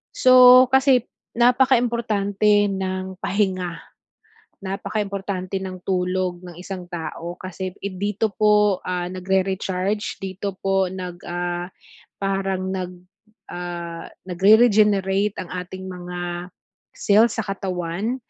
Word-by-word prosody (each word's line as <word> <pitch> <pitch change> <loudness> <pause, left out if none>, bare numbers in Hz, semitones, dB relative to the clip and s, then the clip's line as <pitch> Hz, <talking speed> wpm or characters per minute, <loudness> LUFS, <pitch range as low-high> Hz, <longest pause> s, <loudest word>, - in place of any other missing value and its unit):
So, 255 0 +8
kasi 265 -2 +4 0.3
napaka-importante 230 -5 +3
ng 190 -1 -3
pahinga. 185 -4 -1 0.9
Napaka-importante 195 -1 -3
ng 185 -1 -6
tulog 180 -1 -1
ng 175 -2 -10
isang 185 0 -6
tao 170 0 -6
kasi 185 0 -5
dito 200 +3 -2
po, 210 -2 +3
ah, 180 -1 -2
nagre-recharge, 190 +2 -1
dito 195 +1 -4
po 195 0 +2
nag 180 -2 -6
ah, 175 0 -3 0.5
parang 195 -1 -1
nag 185 -1 -4 0.6
ah, 170 -1 -6 0.2
nagre-regenerate 200 0 +4
ang 180 - -7
ating 185 +1 -6
mga 175 -1 -6 0.5
cell 215 +3 +4
sa 225 - -3
katawan, 195 +2 -3
190 Hz, 100 wpm, -22 LUFS, 180-210 Hz, 0.9 s, So